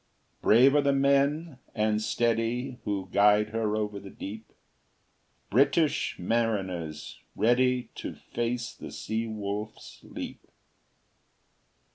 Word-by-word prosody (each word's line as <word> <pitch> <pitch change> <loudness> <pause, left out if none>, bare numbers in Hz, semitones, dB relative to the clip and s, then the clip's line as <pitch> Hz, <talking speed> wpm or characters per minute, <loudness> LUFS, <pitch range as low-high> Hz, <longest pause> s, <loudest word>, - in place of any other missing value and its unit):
Brave 125 +5 +6
are 145 - +5
the 140 0 +2
men, 140 +2 +2 0.2
and 105 0 +1
steady, 120 +3 0
Who 100 -2 -2
guide 105 +1 +4
her 110 -1 -1
over 105 -1 -2
the 100 - -10
deep, 105 +3 -8 1.0
British 140 - +2
mariners, 95 -7 -2 0.2
ready 125 +3 +2
To - - -5
face 120 0 -3
the - - -9
sea 110 +1 -3
wolf's 105 0 -5
leap. - - -8
115 Hz, 105 wpm, -28 LUFS, 105-125 Hz, 1.0 s, Brave